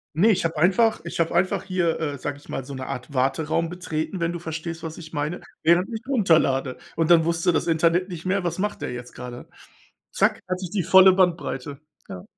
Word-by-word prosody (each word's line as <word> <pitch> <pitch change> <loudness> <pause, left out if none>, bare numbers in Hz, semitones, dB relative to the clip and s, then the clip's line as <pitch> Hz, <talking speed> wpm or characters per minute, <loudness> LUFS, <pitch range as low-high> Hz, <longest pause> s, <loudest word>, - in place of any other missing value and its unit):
Ne, 205 +8 +4
ich 190 - +1
habe 165 -1 -2
einfach 195 +8 +3
ich 170 - -6
habe 165 +1 +1
einfach 185 +1 +1
hier, 180 -4 0
äh, 145 -3 -3
sage 145 +2 -4
ich 145 - -19
mal, 135 - -4
so 140 - -8
'ne 130 -1 -6
Art 125 +4 -6
Warteraum 155 +5 0
betreten, 180 0 -4
wenn 170 0 0
du 175 - -5
verstehst 165 0 -5
was 160 -1 -7
ich 160 -2 -11
meine, 150 +3 -3 0.2
während 170 +3 +4
ich 220 - -4
runterlade. 160 - +2 0.2
Und 165 +1 +1
dann 165 -2 +6
wusste 170 +1 +1
das 160 - 0
Internet 170 +3 +2
nicht 175 -2 -8
mehr, 190 +1 0
was 170 -1 -2
macht 210 +2 -2
der - - -3
jetzt 125 0 -8
gerade? 125 0 -9 0.6
Zack, - - +1
hatte 185 +1 -3
ich 175 - -6
die 195 -5 0
volle 190 +1 +7
Bandbreite, 165 -7 0 0.3
ja. 90 - -7
165 Hz, 220 wpm, -24 LUFS, 150-185 Hz, 0.6 s, volle